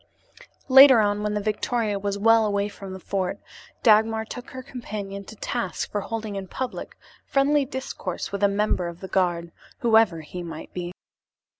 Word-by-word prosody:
Later 265 -2 +9
on, 205 -1 +1
when 210 0 -1
the - - +1
victoria 215 0 -1
was 200 0 -2
well 225 +2 +5
away 200 -1 0
from 195 -1 -9
the 190 - -7
fort, 185 0 -2 0.5
Dagmar 220 0 +4
took 245 +3 -8
her 260 0 -8
companion 205 -6 -6
to 220 - -11
task 240 +3 -3
for 205 - -1
holding 220 -1 -5
in 195 -1 -5
public 255 +6 -5 0.3
friendly 280 +1 +2
discourse 260 -8 -5
with 200 0 -4
a 200 - +5
member 200 -3 0
of 170 0 -8
the 190 - -7
guard, 175 -3 0 0.3
whoever 220 -8 +4
he 175 +4 -7
might 165 -2 -8
be. 175 -1 -4
210 Hz, 170 wpm, -25 LUFS, 190-225 Hz, 0.5 s, Later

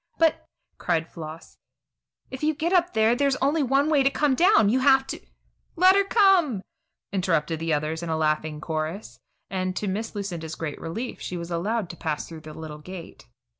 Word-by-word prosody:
"But," 325 -1 +2 0.3
cried 165 -2 0
Floss, 160 0 -9 0.7
"if 260 - -7
you 310 0 +1
get 330 +5 -1
up 355 -1 +3
there, 220 +1 +4
there's 275 +1 +2
only 285 +4 +1
one 275 +2 +2
way 305 -3 +3
to 270 - +4
come 290 0 +1
down. 355 - +5
You 240 +6 +3
have 265 0 +5
to - - -6 0.3
" - - -44
"Let 370 +2 +6
her 400 - +4
come!" 375 - +3 0.5
interrupted 165 -4 0
the 165 0 -2
others 155 +2 -1
in 170 - -5
laughing 155 -1 0
chorus, 155 - -4 0.3
and, 185 -1 -2
to 210 - -2
Miss 215 +4 -3
Lucinda's 175 -6 -4
great 155 -3 -5
relief, 225 +10 -5
she 180 - -4
was 170 0 -6
allowed 200 +5 -1
to 170 - -12
pass 155 -3 -3
through 165 -2 -10
the 155 -1 -10
little 155 -1 -8
gate. 180 +2 -10
195 Hz, 190 wpm, -25 LUFS, -, 0.7 s, Let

